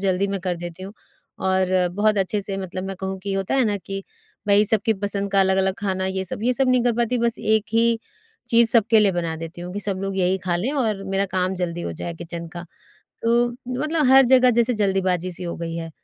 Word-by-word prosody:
जल्दी 195 0 +1
मैं 195 -1 -2
कर 180 -1 -2
देती 175 +1 -8
हूँ। 195 +2 -7 0.5
और 190 0 +2 0.3
बहुत 210 +1 +2
अच्छे 195 +2 0
से 195 0 -4
मतलब 185 -1 -5
मैं 195 0 -5
कहूँ 190 0 -4
कि 195 +1 -4
होता 195 +5 -1
है 265 - +3
ना 210 -2 0
कि, 195 0 -6 0.4
भाई 205 0 +5
सबकी 220 +1 +1
पसंद 200 -1 -2
का 195 - +4
अलग-अलग 190 0 +2
खाना 190 -2 -1
ये 190 0 -2
सब, 205 +4 -5
ये 250 - +2
सब 260 +1 +1
नहीं 255 -1 +3
कर 245 - +3
पाती, 240 +1 +1
बस 235 0 0
एक 215 -1 +1
ही 230 0 +3 0.5
चीज़ 230 -1 +5
सबके 225 -1 +4
लिए 200 -2 +4
बना 170 -2 -2
देती 165 +2 -8
हूँ 180 +1 -6
कि 205 - -4
सब 195 -2 -3
लोग 195 0 -3
यही 185 0 +1
खा 175 -2 +1
लें 210 +10 -1
और 220 -8 -1
मेरा 195 +1 0
काम 185 0 +1
जल्दी 175 -1 -3
हो 85 - -4
जाए 170 - -6
किचन 170 0 -7
का। 175 - -6 0.6
तो 235 +1 +3 0.3
मतलब 305 -2 +1
हर 270 0 +8
जगह 255 0 +6
जैसे 240 +1 +2
जल्दीबाजी 190 -3 0
सी 180 - -8
हो 170 - -4
गई 165 0 -5
है, 165 -1 -5
195 Hz, 235 wpm, -22 LUFS, 185-225 Hz, 0.6 s, हर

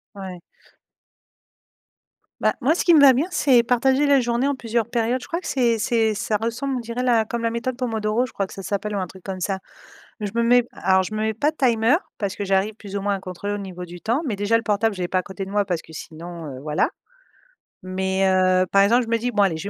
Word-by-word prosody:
Ouais. 190 -3 -8 2.0
Bah, - - +2
moi 300 +5 +3
ce - - -1
qui 345 -2 +6
me 300 - +7
va 275 -2 +8
bien, 280 +7 0
c'est 265 -9 +4
partager 265 +4 +2
la 280 -1 +5
journée 240 +2 0
en 285 - 0
plusieurs 230 -2 -1
périodes. 235 +2 0
Je - - -10
crois 335 - -2
que 370 - -14
c'est 240 -4 +2
c'est 225 -1 +1
ça 215 0 -1
ressemble, 250 +4 -2
on - - -2
dirait 235 +1 -4
la 235 -3 +3
comme 235 +1 -4
la 230 - +1
méthode 240 +2 -3
Pomodoro 225 -1 0
je 255 - -12
crois 195 -1 -2
que - - -12
ça 195 - -8
s'appelle, 205 +2 -3
ou 200 - 0
un 185 - -1
truc 185 +1 -14
comme 190 -1 -5
ça 190 +1 -2 0.6
mais 210 - -2
je 195 - -9
me 235 - +2
mets 245 +1 +5
alors 190 +1 +2
je 200 - -6
me 215 - -2
mets 220 0 0
pas 290 +8 +1
de - - -28
timer 240 -2 +3 0.2
parce 200 -3 -3
que 205 - -4
j'arrive 195 +2 +1
plus 200 -2 -7
ou - - -3
moins 200 0 0
à - - -5
contrôler 190 +2 -5
au - - -2
niveau 185 -3 -7
du 175 0 -11
temps, 240 +9 0
mais 215 - -1
déjà 205 +3 +2
le 230 - -4
portable, 215 0 +1
je 185 - -6
l'ai 175 - -1
pas 185 - +1
à - - -1
côté 195 0 -6
de 195 - -9
moi 205 0 +2
parce 180 -4 -2
que 160 - -16
sinon, 165 +1 -8
heu, 130 -2 -7
voilà 150 0 0 0.9
mais, 190 +1 0
heu, 185 0 +3
par 195 - +6
exemple, 235 +5 +4
je 225 - -9
me 230 - +2
dis: 245 +2 -2
«Bon 205 -3 +1
allez, 190 -5 +3
je - - -6
215 Hz, 270 wpm, -22 LUFS, 190-240 Hz, 2.0 s, va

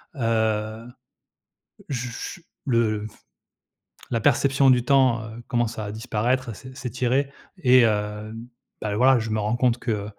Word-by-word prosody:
heu - - -10
heu, 110 0 0 1.0
j 125 -3 -2
j 170 +8 -7 0.2
le 110 -4 +1 1.1
la 115 -2 0
perception 135 +3 +3
du 125 -2 +4
temps, 130 -4 +3
heu, 110 +2 -9
commence 120 -1 -1
à 105 -1 -4
disparaître, 120 +3 -1
à - - -4
s'é 130 +5 -12
s'étirer 130 +2 -1 0.3
et 130 -7 +5
hem, 105 0 -1 0.4
bah, 105 -1 -2
voilà, 130 +4 +5
je 110 0 -4
me 110 - 0
rends 105 +2 0
compte 120 -1 +2
que 105 -5 -2
115 Hz, 145 wpm, -24 LUFS, 110-130 Hz, 1.1 s, et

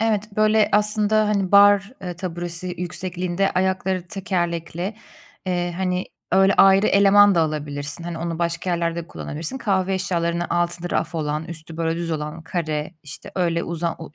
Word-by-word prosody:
Evet, 215 -2 0
böyle, 215 0 +4
aslında, 210 0 +2
hani, 200 -3 0
bar, 200 +1 +6
eee, 180 -2 -5
taburesi 175 0 -5
yüksekliğinde 180 +2 -2
ayakları 190 -1 0
tekerlekli, 175 -1 -3 0.5
eee, 175 -1 -1
hani, 185 0 -1 0.3
öyle 195 +1 +5
ayrı 195 +1 +6
eleman 200 0 +6
da 170 - +3
alabilirsin. 150 0 -3
Hani, 170 -1 -5
onu 165 0 -3
başka 170 +1 -1
yerlerde 170 0 -1
de - - -14
kullanabilirsin. 165 - -5
Kahve 195 -4 0
eşyalarına 175 -2 -1
altında 175 0 -1
raf - - -1
olan, 150 -1 -2
üstü, 165 -1 -9
böyle, 165 0 -1
düz 170 -1 -3
olan, 150 +1 -4
kare, 160 -1 -3
işte, 145 0 -9
öyle 170 -2 0
uzan 170 0 -2
o 165 - -8
175 Hz, 155 wpm, -22 LUFS, 165-195 Hz, 0.5 s, bar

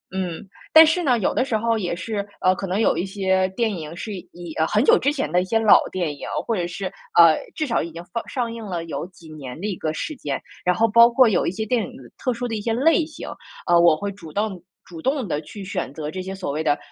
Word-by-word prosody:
嗯。 185 -1 -4 0.3
但 320 0 +10
是 325 +3 +1
呢， 255 -6 +3
有 195 - 0
的 - - +2
时 235 -5 0
候 230 +1 +1
也 180 -5 -2
是， 200 +2 -3 0.2
呃， 185 - +4
可 195 - -5
能 190 +3 -1
有 225 - +3
一 - - 0
些 190 -1 +1
电 220 +4 -1
影 160 -2 -6
是 215 - -5
以， 175 -3 -9
呃， 160 - +3
很 215 +4 +2
久 - - +6
之 285 - +1
前 285 -2 -2
的 180 - +3
一 - - -3
些 225 +4 +1
老 220 -2 +7
电 175 -5 -2
影， - - -8 0.2
或 230 - 0
者 175 -2 -1
是， 175 +3 -5 0.3
呃， 165 -2 +8 0.2
至 310 - -1
少 235 -5 0
已 170 - -5
经 170 +1 -8
上 230 - -3
上 240 -4 -3
映 230 -1 -7
了 175 -4 -4
有 165 +1 -5
几 175 -3 -17
年 135 -2 -8
的 - - -4
一 200 - -2
个 155 - -2
时 310 - -4
间， 145 - -3 0.2
然 180 0 +2
后 225 +5 +3
包 235 +2 +7
括 255 +1 +5
有 190 - +1
一 - - +1
些 220 +3 -4
电 230 0 +1
影 - - -8 0.2
特 255 - -1
殊 245 +1 -4
的 225 - -3
一 210 - -3
些 225 +2 -1
类 320 +8 +3
型， 315 - -9 0.4
呃， 175 -1 +5
我 170 -2 +6
会 200 +4 -3
主 175 -6 -11
动 205 -3 -2 0.2
主 165 -3 -10
动 265 -4 0
地 150 -3 -2
去 200 +6 -10
选 185 -8 -3
择 150 0 -5
这 185 - -5
些 190 +1 -6
所 190 -6 -4
谓 155 +2 -2
的， 150 -2 +2
190 Hz, 295 characters per minute, -22 LUFS, 170-230 Hz, 0.4 s, 但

